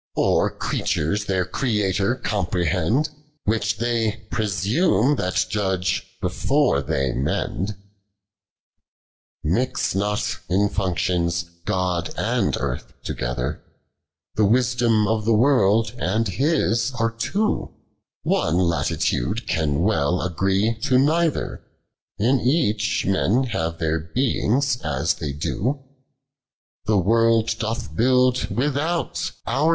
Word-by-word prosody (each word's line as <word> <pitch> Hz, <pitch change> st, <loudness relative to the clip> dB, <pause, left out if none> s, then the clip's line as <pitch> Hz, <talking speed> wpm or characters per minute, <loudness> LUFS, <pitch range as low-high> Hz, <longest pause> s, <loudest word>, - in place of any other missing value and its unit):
Of -, -, +2 dB
creatures 100 Hz, +8 st, -1 dB
their 95 Hz, -2 st, 0 dB
Creator 105 Hz, -2 st, 0 dB
comprehend: 90 Hz, -, 0 dB, 0.3 s
"Which 110 Hz, +1 st, 0 dB
they 115 Hz, -2 st, -1 dB
presume 110 Hz, -, +2 dB
that 90 Hz, 0 st, 0 dB
judge 95 Hz, -4 st, -1 dB
before 125 Hz, -, +1 dB
Hixc 70 Hz, +9 st, -1 dB, 2.2 s
not 105 Hz, +1 st, -1 dB
in 100 Hz, +3 st, +2 dB
functions 85 Hz, -3 st, 0 dB, 0.2 s
God 90 Hz, -4 st, -1 dB
and -, -, 0 dB
Earth -, -, -4 dB
togcthi 60 Hz, 0 st, -3 dB, 0.7 s
The 110 Hz, -, +2 dB
wisdom 115 Hz, -1 st, +2 dB
of 110 Hz, -1 st, 0 dB
the 115 Hz, 0 st, +4 dB
world 115 Hz, -3 st, +3 dB
and 110 Hz, +2 st, 0 dB
His 130 Hz, -, +1 dB
arc 115 Hz, 0 st, -1 dB
two; 210 Hz, -, 0 dB, 0.5 s
One 80 Hz, -, +1 dB
Intituile 85 Hz, -8 st, 0 dB
can 75 Hz, -2 st, 0 dB
well 90 Hz, -5 st, +2 dB
a<^o 95 Hz, +6 st, 0 dB
to 130 Hz, 0 st, +3 dB
neither. 160 Hz, +4 st, +1 dB, 0.6 s
In 125 Hz, +6 st, +2 dB
each, 115 Hz, -6 st, +1 dB
men 100 Hz, +6 st, +2 dB
have 85 Hz, -10 st, -2 dB
tlicir 80 Hz, 0 st, -2 dB
beings 130 Hz, +1 st, +1 dB
iis 75 Hz, +4 st, 0 dB
thev 75 Hz, -5 st, -5 dB
lio; 135 Hz, +6 st, -1 dB, 1.0 s
Tlie 100 Hz, -5 st, +2 dB
woild 115 Hz, +1 st, +3 dB
ilotli 110 Hz, -6 st, -4 dB
build 125 Hz, +3 st, +3 dB
without, 150 Hz, +6 st, -1 dB
our 155 Hz, +3 st, +1 dB
105 Hz, 100 wpm, -23 LUFS, 90-120 Hz, 2.2 s, the